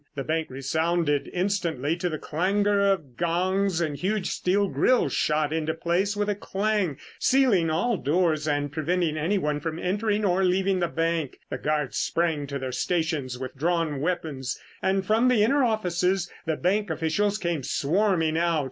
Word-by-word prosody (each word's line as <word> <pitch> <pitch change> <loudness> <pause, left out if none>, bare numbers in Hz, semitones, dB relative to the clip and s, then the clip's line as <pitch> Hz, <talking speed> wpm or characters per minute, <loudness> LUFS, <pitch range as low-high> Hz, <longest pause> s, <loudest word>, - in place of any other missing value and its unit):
The 135 - -3
bank 160 +2 -1
resounded 145 +2 0
instantly 170 -6 -1
to 180 0 -1
the 155 - -3
clangor 200 +6 +1
of 145 -11 -3
gongs 180 +2 +1
and 155 -3 -1
huge 195 +5 -1
steel 200 +2 +1
grills 255 +5 +2
shot 150 0 +1
into 160 0 -1
place 180 +5 0
with 205 0 0
a 205 - +1
clang, 200 -5 -1 0.2
sealing 240 -11 +3
all 185 +8 +1
doors 155 -1 +1
and 145 -1 0
preventing 160 +1 0
anyone 155 -2 0
from 160 +1 -4
entering 210 +4 0
or 190 0 +2
leaving 190 +1 +2
the 175 - +1
bank. 165 -3 -1
The - - -3
guards 150 -3 -1
sprang 160 -4 0
to 140 0 -4
their 130 -1 -4
stations 150 -3 -1
with 130 +1 -6
drawn 160 -1 0
weapons 155 -6 -2 0.2
and 190 0 +1
from 225 +5 +3
the 245 -4 +4
inner 275 +5 +3
offices 185 -5 0 0.2
the 160 -2 0
bank 200 +3 0
officials 160 +6 0
came 170 -6 -2
swarming 165 +3 +1
out. 170 -2 +2
170 Hz, 165 wpm, -26 LUFS, 155-195 Hz, 0.2 s, the